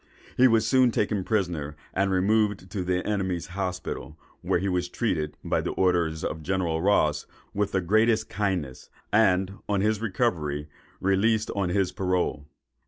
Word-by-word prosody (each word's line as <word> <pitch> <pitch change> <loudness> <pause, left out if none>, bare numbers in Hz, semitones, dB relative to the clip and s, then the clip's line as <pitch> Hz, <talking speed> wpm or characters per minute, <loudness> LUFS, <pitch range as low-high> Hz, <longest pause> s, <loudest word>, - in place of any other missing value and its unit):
He 130 - +6
was 115 -2 +3
soon 130 +1 +4
after - - -6
taken 100 -2 0
prisoner, 85 -9 -1 0.2
and 95 +1 +1
removed 100 0 +1
to 95 -3 -2
the 90 0 -1
enemy's 95 -5 -1
hospital, 90 -5 -4 0.2
where - - +1
he 95 +3 -2
was 90 -1 -1
treated, 80 -11 -2
by - - 0
the - - -3
orders 85 -4 +1
of 80 - -3
General 85 -2 -1
Ross, 75 -6 +2 0.3
with 100 0 0
the 95 - +1
greatest 110 +4 +2
kindness; 95 -10 -3 0.2
and, 95 -2 +3
on 100 -2 +1
his 105 +1 +1
recovery, 85 - -1 0.3
released 105 +3 +2
on 100 -3 -1
his 95 0 +1
parole. 90 -7 -1
95 Hz, 160 wpm, -26 LUFS, 85-105 Hz, 0.3 s, He